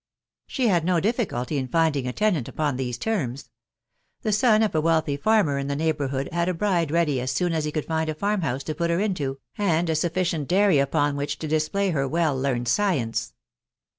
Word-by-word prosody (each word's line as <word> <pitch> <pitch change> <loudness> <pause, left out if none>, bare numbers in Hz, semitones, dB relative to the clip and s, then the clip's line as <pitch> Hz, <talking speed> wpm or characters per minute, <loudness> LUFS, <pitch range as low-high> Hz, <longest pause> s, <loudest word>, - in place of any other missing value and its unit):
She 260 -4 0
had 175 -6 +2
no 175 0 +2
difficulty 170 - -1
in 130 - -3
rinding 155 -6 +1
a - - -1
tenant 185 - 0
upon 150 -4 -1
these 125 -2 -3
terms: 140 - -3 0.7
the 215 - 0
son 215 +1 +4
of 215 - 0
a 155 - +2
wealthy 160 -3 +1
farmer 150 -3 +2
in 140 - -3
the 140 - -1
neighbourhood 140 -3 -1
had 170 +1 0
a 180 - -1
bride 175 -4 +1
ready 150 -5 +1
as 130 - -3
soon 165 +6 0
as 160 -2 -1
he 150 - -2
could 155 -1 -3
find 160 -1 -1
a 155 - -2
farm 200 +4 0
house 135 -3 -2
to 155 - -3
put 170 +2 -1
her 170 +1 +1
into, 155 -10 -1 0.2
and 170 -4 +1
a - - 0
sufficient 165 -2 -1
dairy 190 -4 +4
upon 145 +1 +1
which 145 +1 -3
to 160 - -5
display 160 +6 0
her 135 -4 0
well 160 -1 +1
learned 130 -2 -1
science. 130 - 0
160 Hz, 210 wpm, -24 LUFS, 140-180 Hz, 0.7 s, son